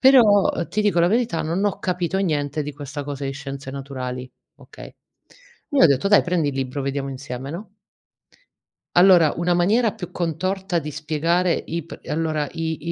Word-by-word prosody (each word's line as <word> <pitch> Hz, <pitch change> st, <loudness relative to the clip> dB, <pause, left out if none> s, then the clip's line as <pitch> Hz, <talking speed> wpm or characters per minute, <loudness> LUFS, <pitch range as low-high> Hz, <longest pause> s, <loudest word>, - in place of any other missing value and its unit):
Però 230 Hz, -7 st, +6 dB, 0.2 s
ti 215 Hz, -, -1 dB
dico 205 Hz, -4 st, +2 dB
la 170 Hz, -, +5 dB
verità, 230 Hz, -3 st, +1 dB
non 170 Hz, +6 st, -1 dB
ho 205 Hz, -, 0 dB
capito 180 Hz, +1 st, -1 dB
niente 150 Hz, -5 st, -1 dB
di 150 Hz, -, -5 dB
questa 145 Hz, 0 st, -6 dB
cosa 140 Hz, -1 st, -5 dB
di 135 Hz, -, -2 dB
scienze 135 Hz, -1 st, -7 dB
naturali". 130 Hz, -2 st, -6 dB, 0.3 s
Okay. -, -, -13 dB, 0.8 s
Io 285 Hz, -, +3 dB
ho -, -, +10 dB
detto: 140 Hz, +6 st, +2 dB
"Dai 205 Hz, -, +6 dB
prendi 175 Hz, -5 st, 0 dB
il 140 Hz, -, -3 dB
libro 135 Hz, +1 st, -3 dB
vediamo 140 Hz, 0 st, -2 dB
insieme". 130 Hz, 0 st, -6 dB
no? 190 Hz, +8 st, -7 dB, 1.3 s
Allora 175 Hz, -4 st, +6 dB
una 175 Hz, +1 st, +1 dB
maniera 210 Hz, +6 st, +3 dB
più 190 Hz, -6 st, -8 dB
contorta 185 Hz, +2 st, -2 dB
di 150 Hz, -1 st, -6 dB
spiegare 160 Hz, +4 st, 0 dB, 0.2 s
i 165 Hz, -1 st, -3 dB
p -, -, -10 dB
allora 155 Hz, -1 st, -1 dB
i 160 Hz, -1 st, -2 dB
165 Hz, 170 wpm, -22 LUFS, 140-185 Hz, 1.3 s, ho